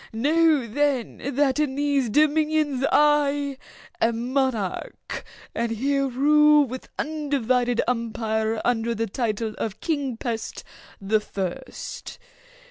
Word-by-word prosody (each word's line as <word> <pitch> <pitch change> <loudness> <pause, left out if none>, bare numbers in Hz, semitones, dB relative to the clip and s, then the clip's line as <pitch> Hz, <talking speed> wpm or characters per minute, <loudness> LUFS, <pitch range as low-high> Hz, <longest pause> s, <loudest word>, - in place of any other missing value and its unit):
Know 300 +3 +3
then 265 +1 -1
that 285 0 +2
in 290 -3 0
these 285 -3 +1
dominions 300 0 +2
I 290 -2 +2 0.4
am 235 +2 0
monarch, 260 -9 -2 0.3
and 235 0 -1
here 275 +4 0
rule 300 +3 +5
with 255 0 -8
undivided 255 -6 0
empire 225 -2 -1
under 235 -1 +1
the 225 +1 -1
title 220 0 -2
of 215 -1 -3
'King 285 -7 -2
Pest 230 -2 -4 0.4
the 205 +2 +1
First. 190 -4 -6
260 Hz, 110 wpm, -24 LUFS, 225-290 Hz, 0.4 s, rule